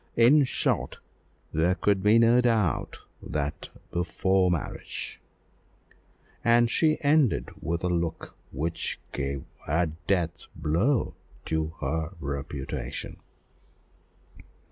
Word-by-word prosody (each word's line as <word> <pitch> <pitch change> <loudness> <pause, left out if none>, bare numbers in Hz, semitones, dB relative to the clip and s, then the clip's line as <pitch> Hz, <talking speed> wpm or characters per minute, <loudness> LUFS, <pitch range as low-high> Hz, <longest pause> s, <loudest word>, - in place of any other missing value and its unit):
In 135 +5 +6
short, - - -1 0.6
there 85 +4 +2
could 100 -1 +2
be 105 +3 +5
no 115 +2 +6
doubt 110 - +1 0.2
that 75 -1 -3 0.2
before 95 +2 +2
marriage," 85 -4 -4 1.2
and 120 0 +4
she 155 -2 +3
ended 145 -3 +3
with 85 +1 -2
a - - +2
look 85 -2 -2 0.2
which 80 +5 -3
gave 70 -1 -3 0.2
a 80 +4 +2 0.2
death 85 -3 0
blow 85 - +1 0.3
to 80 0 -1
the 80 +4 -1
reputation. 70 -2 -5
85 Hz, 100 wpm, -27 LUFS, 75-115 Hz, 1.2 s, In